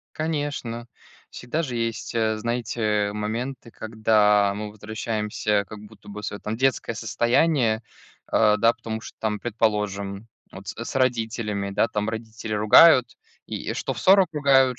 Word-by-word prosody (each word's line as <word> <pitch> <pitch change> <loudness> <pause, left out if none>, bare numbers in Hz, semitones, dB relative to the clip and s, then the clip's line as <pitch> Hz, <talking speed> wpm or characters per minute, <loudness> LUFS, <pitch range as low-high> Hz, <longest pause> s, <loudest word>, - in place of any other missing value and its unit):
Конечно, 145 -7 -3 0.4
всегда 150 +7 -3
же 125 -6 -4
есть, 115 -1 -3
э, 110 -1 +1
знаете, 110 -3 -1
моменты, 115 +4 -4
когда 105 -2 +2
мы 105 0 -5
возвращаемся 105 -1 -2
как 105 -1 -9
будто 105 0 -15
бы 105 +1 -8
в - - -8
свое, 100 - -5
там, 110 +1 -4
детское 130 -2 0
состояние, 120 +1 +1 0.4
а, 105 -1 +3
да, 115 +2 +4
потому 115 -1 -6
что - - -11
там, 105 -1 -1
предположим, 105 -3 -2 0.2
вот 95 +1 -11
с - - -6
с - - -5
родителями, 110 -5 -1
да, 105 +3 +1
там 105 +1 -2
родители 110 -1 -5
ругают, 120 +3 +6 0.3
и - - -5
и - - -2
что - - -2
в - - -8
40 190 -1 +5
ругают, 135 -4 +3
110 Hz, 155 wpm, -24 LUFS, 105-120 Hz, 0.4 s, ругают